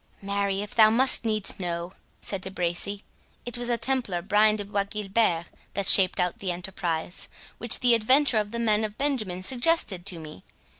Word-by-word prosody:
"Marry, 200 0 -2
if 210 - -9
thou 220 -2 +5
must 250 +2 +5
needs 215 -3 -2
know," 175 0 -5 0.3
said 195 -2 -1
De 190 - -4
Bracy, 190 +2 -2 0.4
"it 245 - -4
was 240 0 -4
the 240 -1 0
Templar 235 -9 -2
Brian 210 +2 +2
de 205 -1 -6
Bois 200 0 -2
Guilbert 200 -4 -1 0.3
that 200 -1 -2
shaped 185 -2 +7
out 180 -1 -2
the 190 -2 -3
enterprise, 175 -1 -4 0.3
which 235 0 +2
the 245 -1 +4
adventure 250 +2 +3
of 210 -1 -4
the 235 - -5
men 220 -2 +1
of 215 -1 -6
Benjamin 215 -11 -3
suggested 245 - -1
to 185 -4 -2
me. 155 - -12
205 Hz, 185 wpm, -25 LUFS, 185-230 Hz, 0.4 s, shaped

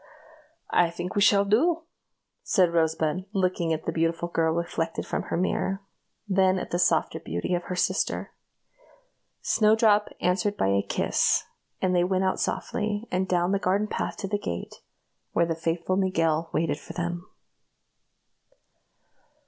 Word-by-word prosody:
"I 175 - +4
think 175 +2 -5
we 205 - +1
shall 200 0 +5
do," 315 - +2 0.6
said 180 -4 +2
Rosebud, 160 +1 +1
looking 185 -4 0
at 160 -1 -2
the - - 0
beautiful 165 +1 -1
girl 165 -1 +1
reflected 165 -1 -2
from - - -2
her - - -1
mirror, 190 +2 -1 0.4
then 190 -1 +3
at - - -5
the 175 - 0
softer 175 - +2
beauty 85 - -3
of 175 0 -1
her 180 - -4
sister. 180 - -1 1.1
Snowdrop 215 -1 +4
answered 190 +3 0
by 95 - +1
a 100 0 +3
kiss, - - +1 0.4
and 185 -1 +2
they 175 - +4
went 185 +1 +1
out 190 - 0
softly, 210 +1 -2
and 185 +1 0
down 175 0 +1
the 200 - +1
garden 195 +3 +1
path - - -3
to 195 - -4
the 205 +1 -1
gate, 85 - -6 0.5
where 170 - +3
the 165 - -1
faithful 165 +2 -1
Miguel 165 -4 +1
waited 150 -2 0
for - - -10
them. 175 0 -4
180 Hz, 150 wpm, -26 LUFS, 165-195 Hz, 1.1 s, shall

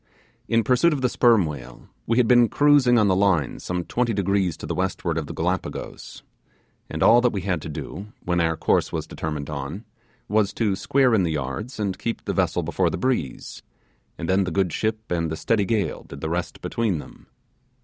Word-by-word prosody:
In 115 0 +2
pursuit 130 +9 +3
of 140 - -2
the 125 - +2
sperm 115 -6 +4
whale, 75 -5 -8 0.2
we 115 - +1
had 125 -2 +4
been 120 -2 +5
cruising 145 -4 +4
on 105 -3 +4
the 95 - +3
line 95 -8 +1
some 90 -1 -3
twenty 120 +3 -1
degrees 100 -3 0
to - - -8
the 80 - -3
westward 90 -2 -2
of 80 -3 -3
the - - -6
Gallipagos; 90 +3 -4 0.7
and - - -2
all 120 - +7
that 125 -1 +3
we 100 - -3
had 90 -3 -1
to 75 - -7
do, 95 +6 -7 0.2
when 90 -1 +1
our 80 -1 +1
course - - +1
was - - -3
determined 75 -3 -5
on, 75 - -5 0.4
was 105 -1 +1
to 105 -4 0
square 130 +4 +2
in 110 - +4
the 85 -3 0
yards 75 - -4
and 100 -3 -2
keep 115 - -4
the - - -1
vessel - - +1
before - - 0
the - - -3
breeze, 125 - -2 0.6
and 85 - -4
then 95 +1 +3
the 90 - -2
good 90 -1 0
ship 110 -1 -2
and 85 -2 0
the 80 - -4
steady 105 +1 +1
gale 105 0 -1
did 70 - -11
the 80 - -3
rest 85 +1 -3
between 110 -7 0
them. 75 - -12
95 Hz, 210 wpm, -24 LUFS, 85-115 Hz, 0.7 s, all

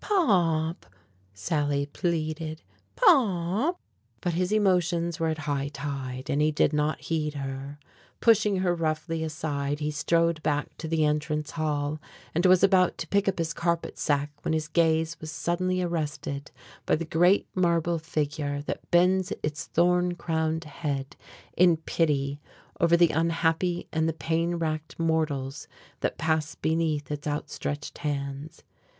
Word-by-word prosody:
"Pop!" 170 - +2 0.4
Sally 140 - -1
pleaded, 155 0 -3 0.3
"Pop!" 240 - +3 0.4
But 175 -2 -1
his 180 +3 0
emotions 180 -5 +2
were 165 - +1
at 160 -1 -1
high 145 -2 -2
tide 140 -3 -5
and 145 - +1
he 155 - +4
did 150 0 +2
not 150 +1 0
heed 155 -2 -2
her. 135 +1 -5 0.4
Pushing 215 -3 +4
her 180 -2 +2
roughly 165 0 -1
aside, 145 -2 -2
he 150 0 -1
strode 165 +2 +1
back 145 -1 -1
to 160 - -4
the 160 -1 +2
entrance 150 0 -1
hall, 150 -1 -2 0.3
and 175 +3 +3
was 185 0 +5
about 190 -2 +4
to 160 - -5
pick 200 0 +2
up 190 - -3
his 165 -1 -1
carpet 170 0 -1
sack 145 -1 0
when - - -1
his 155 -1 -1
gaze 160 0 +2
was 155 - -6
suddenly 185 +3 -1
arrested 150 -4 -3 0.4
by - - +4
the 170 - -3
great 175 +5 +3
marble 170 -2 +1
figure 145 -2 -2
that - - -5
bends 180 +1 +3
its 150 0 -3
thorn 180 +1 +2
crowned 160 -1 -1
head 145 -1 -4 0.4
in 175 -2 +5
pity 145 -3 0 0.4
over 170 0 +5
the 170 -1 +5
unhappy 165 +2 0
and 160 0 +1
the - - -1
pain 165 +2 -1
racked 155 -2 -3
mortals 150 -4 -1 0.3
that - - -1
pass 160 -1 0
beneath 155 -3 -1
its 150 0 -4
outstretched 145 0 -4
hands. 145 +1 -4
160 Hz, 145 wpm, -27 LUFS, 150-170 Hz, 0.4 s, was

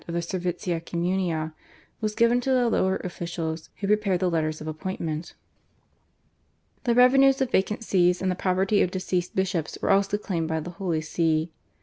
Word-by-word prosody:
of 170 - -4
the - - +1
/servitia 175 -1 -3
communia/, 170 -2 -1 0.5
was 215 -1 -1
given 235 +1 +3
to 265 - -3
the 250 -2 +3
lower 190 -4 +2
officials, 170 -2 -4
who 200 - -5
prepared 200 -3 +2
the 180 -1 +1
letters 155 -1 -1
of 155 - -8
appointment. 160 0 -4 1.5
The 235 -1 +2
revenues 270 +2 +6
of 265 -2 0
vacant 210 +4 +1
Sees 180 -4 +3
and 190 -1 0
the - - -1
property 190 +3 +1
of - - +2
deceased 185 -1 -2
bishops 190 -4 -1
were - - +1
also 200 +1 +3
claimed 170 -6 -2
by 160 0 -1
the 175 +3 -6
Holy 170 -3 -2
See. 160 0 0
180 Hz, 175 wpm, -26 LUFS, 165-200 Hz, 1.5 s, revenues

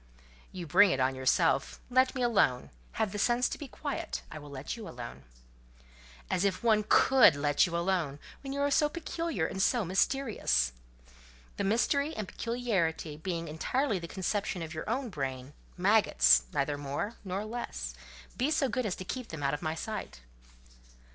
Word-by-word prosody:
"You 180 -2 -6
bring 190 +5 +6
it 135 - 0
on 130 +1 +2
yourself: 130 +1 +1
let 255 +1 +3
me 255 - -1
alone: 200 - +2 0.2
have 220 -3 -1
the 205 - -4
sense 240 +3 +3
to - - -5
be 290 - -6
quiet: 285 +2 -4
I 155 - -7
will 145 -1 -11
let 140 - -5
you 225 -3 -8
alone." 120 - -9 1.0
"As 180 - 0
if 195 0 0
one 215 -2 +4
could 250 - +6
let 145 +2 +2
you 170 -1 -2
alone, 170 -5 0 0.2
when 270 - -6
you 280 +1 -2
are 285 0 +1
so 295 +1 +3
peculiar 330 - -3
and 190 +3 -3
so 235 +1 +2
mysterious!" 185 - +1 0.8
"The - - -1
mystery 280 +9 +1
and 215 -3 -4
peculiarity 195 -12 -1
being 165 +1 -4
entirely 210 - -1
the 170 - -7
conception 190 -1 -2
of 160 0 -7
your 155 +5 -5
own 250 +2 -1
brain—maggots—neither 140 - +1
more 145 +11 -4
nor 195 +2 -3
less, 215 - -5 0.4
be 260 +4 +1
so 300 -4 +1
good 250 -3 -1
as 185 - -2
to 185 - -8
keep 255 +4 -5
them 155 -3 -7
out 140 - +1
of 145 - -3
my 155 0 -2
sight." 195 - -6
190 Hz, 170 wpm, -30 LUFS, 145-240 Hz, 1.0 s, bring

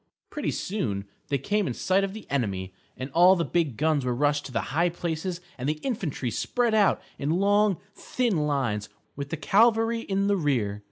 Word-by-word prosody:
_ - - -52
Pretty 295 - -2
soon 110 - -2 0.2
they 140 - +1
came 205 +8 0
in 120 - -3
sight 190 +1 +2
of 195 - -1
the 220 - -9
enemy, 95 -8 -1 0.2
and 130 +2 -5
all 180 +5 +6
the 170 -2 0
big 160 -9 0
guns 155 -2 +2
were 125 -1 0
rushed 145 +2 +1
to - - -11
the 120 +2 -3
high 170 +3 +3
places 170 +1 -3 0.2
and 130 +3 -1
the 155 - -1
infantry 165 - -2
spread 240 - 0
out 210 -2 +4 0.2
in 140 - -2
long, 200 +2 +3 0.2
thin 205 -11 -1
lines, 120 -8 -1 0.3
with 140 0 -5
the 165 - -3
cavalry 225 +7 +3
in 195 -3 -1
the 200 0 +2
rear. 120 - 0
160 Hz, 200 wpm, -26 LUFS, 135-200 Hz, 0.3 s, all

